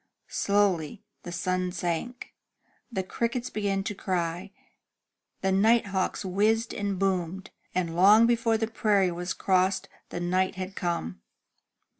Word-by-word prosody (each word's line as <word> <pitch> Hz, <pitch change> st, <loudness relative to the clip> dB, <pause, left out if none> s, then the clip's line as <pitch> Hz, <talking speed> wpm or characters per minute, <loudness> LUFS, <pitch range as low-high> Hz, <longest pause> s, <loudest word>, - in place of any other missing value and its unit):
Slowly 200 Hz, -2 st, +1 dB, 0.2 s
the 175 Hz, -, -8 dB
sun 185 Hz, +1 st, -1 dB
sank. 180 Hz, +8 st, -4 dB, 0.6 s
The 190 Hz, -4 st, -2 dB
crickets 235 Hz, +5 st, -2 dB
began 200 Hz, -2 st, -1 dB
to 210 Hz, -, -3 dB
cry, 180 Hz, -1 st, -2 dB, 0.9 s
the 190 Hz, -, +1 dB
night 220 Hz, +5 st, +4 dB
hawks 195 Hz, -1 st, -2 dB
whizzed 215 Hz, +5 st, +1 dB
and 200 Hz, -2 st, -2 dB
boomed, 190 Hz, -1 st, -1 dB, 0.2 s
and 170 Hz, -3 st, -1 dB
long 205 Hz, +6 st, +7 dB
before 230 Hz, -1 st, +2 dB
the 225 Hz, -, 0 dB
prairie 210 Hz, -4 st, +2 dB
was 175 Hz, +1 st, -3 dB
crossed 190 Hz, 0 st, +1 dB, 0.2 s
the -, -, -5 dB
night 185 Hz, +2 st, 0 dB
had 190 Hz, +1 st, -6 dB
come. 90 Hz, -, -3 dB
190 Hz, 130 wpm, -27 LUFS, 180-210 Hz, 0.9 s, long